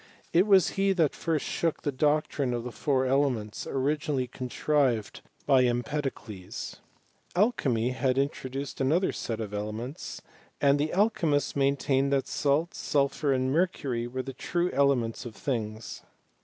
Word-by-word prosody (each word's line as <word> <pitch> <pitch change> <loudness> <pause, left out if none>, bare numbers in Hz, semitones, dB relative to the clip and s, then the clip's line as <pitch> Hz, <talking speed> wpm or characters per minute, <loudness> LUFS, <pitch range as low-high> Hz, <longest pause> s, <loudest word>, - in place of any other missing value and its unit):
It 180 +5 +5
was 195 -4 +6
he 195 0 +4
that 165 -6 +2
first 160 -3 -1
shook 165 -2 -1
the 145 - 0
doctrine 145 -2 +1
of 120 - -3
the 125 - -5
four 130 0 0
ele 140 +2 +3
ments, 110 -4 -5
originally 145 0 0
contrived 125 -2 0 0.2
by 135 -3 +5
Empedocles. 120 -5 -3 0.6
Alchymy 135 - +2
had 130 0 0
introduced 135 0 -2
another 160 +8 +2
set 115 -2 -4
of 105 -2 -5
elements, 110 +7 -5 0.4
and 140 0 +4
the 150 +2 0
al 210 +4 +3
chymists 150 -7 0
maintained 140 0 +2
that 135 -1 +2
salt, 150 +4 +1
sulphur, 140 0 0
and 130 0 +1
mercury, 140 -8 0
were 130 +1 -4
the 135 +1 -6
true 175 +5 -1
elements 130 -4 +1
of 120 -3 -8
things. 110 -4 -4
135 Hz, 145 wpm, -28 LUFS, 125-150 Hz, 0.6 s, was